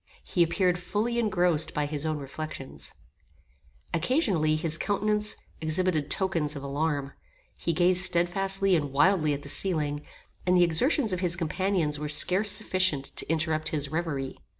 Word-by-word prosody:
He 175 Hz, -, -2 dB
appeared 180 Hz, +1 st, +1 dB
fully 215 Hz, +6 st, -2 dB
engrossed 175 Hz, -8 st, +2 dB
by 150 Hz, -1 st, 0 dB
his 150 Hz, +1 st, -3 dB
own 155 Hz, -1 st, -2 dB
reflections. 140 Hz, 0 st, -8 dB, 1.0 s
Occasionally 170 Hz, -, 0 dB
his 155 Hz, 0 st, 0 dB
countenance 210 Hz, +1 st, +1 dB, 0.3 s
exhibited 160 Hz, -1 st, 0 dB
tokens 165 Hz, -6 st, -1 dB
of 140 Hz, -, -7 dB
alarm; 140 Hz, 0 st, -3 dB, 0.4 s
he 170 Hz, -, -2 dB
gazed 180 Hz, +2 st, +3 dB
stedfastly 190 Hz, +2 st, +1 dB
and 145 Hz, -4 st, -2 dB
wildly 155 Hz, +2 st, +2 dB
at 140 Hz, -, -9 dB
the -, -, -9 dB
ceiling; 150 Hz, -3 st, +2 dB, 0.4 s
and 180 Hz, 0 st, +3 dB
the 175 Hz, -, +5 dB
exertions 215 Hz, -, +2 dB
of 180 Hz, -, -2 dB
his 175 Hz, -2 st, 0 dB
companions 170 Hz, -2 st, -1 dB
were 150 Hz, 0 st, -5 dB
scarcely 195 Hz, +8 st, +5 dB
sufficient 185 Hz, -7 st, -1 dB
to -, -, -1 dB
interrupt 155 Hz, -1 st, -1 dB
his 145 Hz, -2 st, -2 dB
reverie. 150 Hz, -4 st, -4 dB
170 Hz, 150 wpm, -26 LUFS, 150-185 Hz, 1.0 s, the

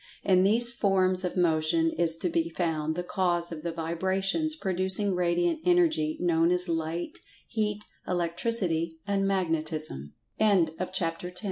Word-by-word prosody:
In 185 Hz, -2 st, +3 dB
these 230 Hz, +5 st, +5 dB
forms 190 Hz, -4 st, +1 dB
of 180 Hz, 0 st, -3 dB
Motion 165 Hz, -1 st, +2 dB
is 165 Hz, -1 st, +3 dB
to 180 Hz, -, -2 dB
be 165 Hz, 0 st, -1 dB
found 160 Hz, -2 st, -2 dB
the 180 Hz, -, -3 dB
cause 175 Hz, -2 st, -1 dB
of 160 Hz, -2 st, -7 dB
the 170 Hz, +1 st, -3 dB
vibrations 190 Hz, -, -1 dB
producing 190 Hz, -, 0 dB
Radiant 175 Hz, -, 0 dB
Energy, 335 Hz, -, +2 dB
known 170 Hz, -1 st, +2 dB
as 180 Hz, +1 st, +1 dB
Light, 165 Hz, -, -3 dB, 0.3 s
Heat, 210 Hz, -2 st, -3 dB, 0.2 s
Electricity 170 Hz, -2 st, -1 dB
and 200 Hz, -1 st, 0 dB
Ma 195 Hz, -2 st, +1 dB
180 Hz, 125 wpm, -27 LUFS, 165-195 Hz, 0.3 s, these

